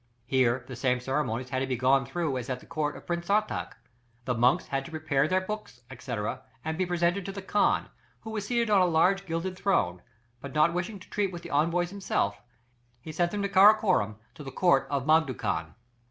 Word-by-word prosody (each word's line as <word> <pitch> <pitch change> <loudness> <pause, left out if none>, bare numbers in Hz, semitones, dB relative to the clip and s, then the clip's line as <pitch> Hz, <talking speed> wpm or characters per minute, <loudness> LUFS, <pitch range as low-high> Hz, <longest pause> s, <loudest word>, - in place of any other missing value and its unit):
There 130 -2 +2
the 130 - -7
same 125 0 +1
ceremonies 130 -2 -2
had 130 - 0
to 135 - -1
be 130 - -1
gone 130 +2 +2
through 165 -4 -2
as 125 - -7
at 130 -1 -2
the - - -16
court 155 -3 -2
of - - -14
Prince 170 0 -3
Sartach. 210 +1 0 0.5
The 125 - 0
monks 120 +2 +3
had 135 0 -1
to - - -8
prepare 155 -3 0
their 185 +3 +2
books, 200 - -7
&c., 125 0 -5 0.5
and 160 0 -2
be 185 +2 -1
presented 175 +2 +1
to - - -3
the 195 0 -7
Khan, 205 +2 +2 0.3
who 220 - -8
was 210 -2 -4
seated 235 -2 +1
on 200 -2 +5
a - - +5
large 180 +3 +2
gilded 165 +3 -3
throne, 90 - +1 0.4
but 140 0 -8
not 155 +3 +4
wishing 180 +4 -3
to 185 - -15
treat 200 -2 0
with 170 -1 -8
the 170 - -8
envoys 170 +4 +1
himself, 180 - -1 0.6
he 155 - -8
sent 175 +2 +1
them 205 +2 -3
to - - +1
Karakorum, 195 - +5 0.2
to 150 - -10
the 135 - -6
court 170 -2 +2
of 140 -2 -1
Mangu 155 -4 +3
khan. 80 +1 -3
160 Hz, 215 wpm, -28 LUFS, 130-185 Hz, 0.6 s, on